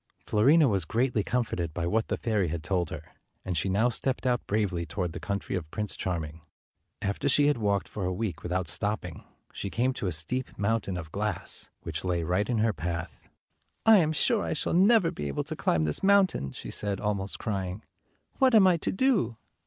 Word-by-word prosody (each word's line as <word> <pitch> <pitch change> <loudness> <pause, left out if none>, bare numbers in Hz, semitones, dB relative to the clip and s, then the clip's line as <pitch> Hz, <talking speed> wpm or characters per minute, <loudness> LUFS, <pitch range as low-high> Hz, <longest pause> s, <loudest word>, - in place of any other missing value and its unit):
Fiorina 140 +9 +5
was 100 -6 +1
greatly 115 +5 0
comforted 90 -10 -2
by 85 - -1
what 110 +5 +1
the - - -1
fairy 105 -5 0
had 80 0 -4
told 90 -3 0
her, 80 - -6 0.4
and 90 - -2
she 85 +5 0
now 100 +6 +3
stepped 130 +2 -2
out 125 -2 0
bravely 100 -5 0
toward 90 0 -3
the - - -5
country 100 -1 -3
of 85 -4 -4
Prince 105 +4 -3
Charming. 80 -3 -4 0.6
After 100 +8 0
she 145 +1 +4
had 145 -4 +2
walked 100 -4 0
for 105 - -5
a 90 - 0
week 95 +1 -3
without 90 0 -2
stop 105 +7 -1
ping, 90 -3 -9 0.3
she 100 - -4
came 125 +6 +1
to 100 - -3
a - - 0
steep 85 +12 -2
mountain 100 -3 0
of 80 -3 -7
glass, 105 -1 -2
which - - -4
lay 90 -2 0
right 90 +7 0
in 120 - +1
her 110 0 +2
path. 85 -2 -4 0.3
" - - -47 0.3
I 225 -1 +8
am 155 -3 +2
sure 215 +7 +2
I - - -1
shall 150 - -2
never 190 0 +5
be 75 - -5
able 70 - -2
to - - -6
climb 80 -2 +1
this 75 -1 0
mountain," 195 - +3
she - - -8
said, 100 -2 -2
almost 100 -2 -2
crying. 95 -1 -3 0.6
"What 260 -3 +5
am 205 -3 +7
I 180 -2 +5
to - - -2
do?" 195 - +1
100 Hz, 210 wpm, -28 LUFS, 90-125 Hz, 0.6 s, I